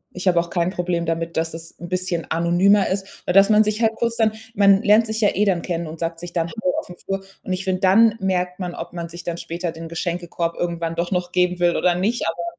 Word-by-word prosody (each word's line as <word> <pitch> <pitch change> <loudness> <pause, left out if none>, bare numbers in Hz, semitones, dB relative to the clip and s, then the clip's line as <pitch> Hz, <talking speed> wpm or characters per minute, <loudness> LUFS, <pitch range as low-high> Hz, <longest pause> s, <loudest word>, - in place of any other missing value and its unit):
ich 180 +1 -4
habe 175 -2 +4
auch 170 0 -3
kein 175 -1 +1
Problem 175 -2 -2
damit, 165 0 -2
dass 165 0 -1
es 165 0 -10
'n 175 - -8
bisschen 185 -2 -2
anonymer 180 +4 +3
ist, 195 0 -5
aber 180 - 0
dass 195 +2 +6
man 215 0 +6
sich 215 +1 -2
halt 225 -1 +3
kurz 230 0 -1
dann 220 -1 +3 0.2
man 200 -1 +5
lernt 215 +2 +5
sich 220 +1 -3
ja 205 - +5
eh 210 - +2
dann 180 -4 +1
kennen 170 -2 -3
und 160 +1 -8
sagt 165 0 -3
sich 175 0 -8
dann 170 -2 0
hallo 185 -4 -2
auf - - -8
dem 180 - -11
Flur. 195 +1 -4 0.2
Und 185 - -3
ich 185 +1 -3
finde, 185 -1 -1
dann 215 +4 +5
merkt 180 -2 -1
man, 180 -2 -4
ob 170 +1 -7
man 170 -1 -5
sich 170 +1 -9
dann 170 -1 -3
später 170 0 -4
den 165 0 -8
Geschenkekorb 170 0 -3
irgendwann 170 -1 -2
doch 170 +2 -2
noch 180 -1 -1
geben 180 0 +1
will 175 -1 +3
oder 180 -1 +2
nicht, 210 +7 0
aber. 165 +1 -2
180 Hz, 260 wpm, -22 LUFS, 170-195 Hz, 0.2 s, dass